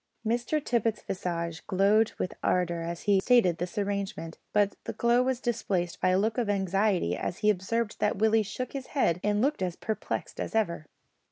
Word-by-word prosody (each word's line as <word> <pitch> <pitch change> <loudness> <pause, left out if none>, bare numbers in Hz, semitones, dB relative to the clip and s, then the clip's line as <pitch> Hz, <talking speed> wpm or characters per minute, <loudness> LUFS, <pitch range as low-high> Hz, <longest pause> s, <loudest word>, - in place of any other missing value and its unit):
Mr 240 +7 0
Tippet's 230 -6 0
visage 170 -2 -3
glowed 205 +4 +3
with - - -2
ardour 175 -2 +1
as 170 0 -5
he 200 -2 +4
stated 190 -6 +3
this 175 +3 -4
arrangement, 200 -5 -3
but 205 -1 +2
the - - -4
glow 235 +1 +3
was 255 -1 0
displaced 200 -8 -2
by - - +3
a 185 - +3
look 215 +4 +1
of 230 -4 -1
anxiety 195 - +1
as 175 - -3
he 210 - +7
observed 210 +3 -2
that 210 -1 +1
Willie 220 +2 +4
shook 220 +5 -5
his 270 -2 -5
head 175 -10 +2
and 210 +1 +1
looked 290 -3 +1
as 180 -2 -1
perplexed 220 -1 -4
as - - -4
ever. 170 -8 0
205 Hz, 185 wpm, -28 LUFS, 180-225 Hz, -, he